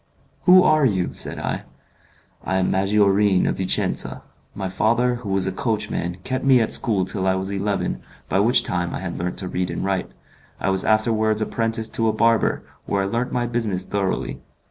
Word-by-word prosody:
"Who 185 0 +8
are 155 -1 +4
you?" 95 -8 +1
said - - -2
I. - - -3 0.8
"I 95 - -2
am 95 -1 +1
Maggiorin, 100 0 +3
of - - -1
Vicenza. 95 -1 -1 0.3
My 95 -1 -3
father, 120 +6 +1
who 115 -4 -8
was 95 -1 +1
a 95 - -1
coachman, 95 -5 -2
kept 130 0 -3
me 135 -2 +5
at 110 - +1
school 100 -5 +2
till 95 0 -2
I 95 - +2
was 95 +1 -3
eleven, 100 0 -2 0.3
by 95 - +1
which 120 +5 +4
time 90 -1 -2
I - - -4
had 95 -2 -5
learnt 90 +1 -3
to 95 - -3
read 90 0 -2
and - - -3
write; 95 -2 -1 0.5
I 95 - 0
was 95 0 0
afterwards 110 0 +2
apprenticed 115 0 -1
to 115 - +1
a 110 - +2
barber, 115 0 +2 0.2
where 100 -1 0
I - - -1
learnt 120 +5 -2
my 120 -1 0
business 110 -6 -1
thoroughly. 100 -2 -2
100 Hz, 190 wpm, -22 LUFS, 95-115 Hz, 0.8 s, Who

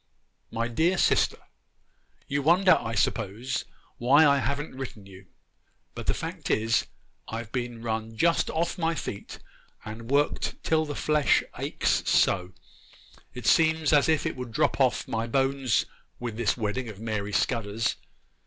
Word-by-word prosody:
'MY 115 +1 -2
DEAR 165 +10 +1
SISTER, - - +2 0.9
'You 140 0 -1
wonder, 180 +6 +5
I 115 0 -4
s'pose, 110 +5 -1 0.3
why 135 +6 +6
I 140 -1 +4
haven't 140 +2 -2
written 130 -6 -7
you; 95 -1 -14 0.7
but - - -8
the - - +2
fact - - -5
is, 115 +1 +1 0.4
I've 115 -1 -6
been 120 -2 -4
run 110 -1 -3
just 170 +5 +2
off 170 +2 -1
my 165 0 +1
feet 105 -7 -6 0.5
and 110 +2 -8
worked 145 +2 +1
till 160 -1 +2
the 145 -1 -5
flesh 150 -1 +2 0.2
aches - - 0
so, 90 -1 +2 0.8
it 125 -2 -7
seems 160 +1 +3
as 145 +1 +4
if 155 -2 +2
it - - -2
would 125 -2 -6
drop - - +1
off - - +2
my 115 +1 -2
bones 135 -2 +1 0.3
with 120 -3 -4
this 115 0 0
wedding 115 +2 -2
of 105 -3 -9
Mary 110 -2 -3
Scudder's. 115 -1 0
120 Hz, 150 wpm, -27 LUFS, 110-145 Hz, 0.9 s, why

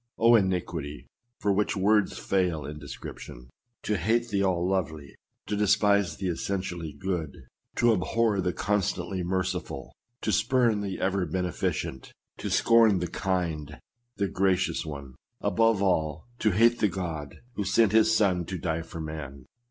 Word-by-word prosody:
Oh! 115 +1 +5
iniquity 90 -8 0 0.3
for 100 - +1
which 105 +1 0
words 105 +2 +2
fail 90 -6 0
in 75 +1 -7
description! 65 -3 -9 0.3
To 105 - 0
hate 115 +7 +1
the 100 -2 0
all 90 -2 +1
lovely 80 -7 -2 0.2
— - - -54
to 105 - -2
despise 100 -1 +3
the 95 - -3
essentially 90 -2 -3
good 80 -2 -4 0.2
— - - -44
to 120 -1 +4
abhor 105 +1 +1
the 90 0 0
con 105 +3 +1
stantly 90 0 -2
merciful 90 -8 -3
— 120 +1 -51
to 110 - +1
spurn 115 -1 +2
the 100 -2 -4
ever 95 -1 0
beneficent 90 -7 -3
— - - -60
to - - -3
scorn 115 -4 +5
the 90 -2 -3
land, 80 -6 -2 0.4
the 100 - +1
gracious 95 -4 0
one; 70 -3 -7 0.3
above 105 +1 +2
all, 80 -5 0
to 110 - +3
hate 115 +4 +4
the 105 - +4
God 85 -6 -5 0.2
who 105 - -2
sent 100 +2 +3
his 110 0 +5
son 95 -4 +2
to 95 +3 -4
die 80 -1 -2
for 80 +1 -9
man 75 -4 -7
95 Hz, 165 wpm, -27 LUFS, 80-105 Hz, 0.4 s, Oh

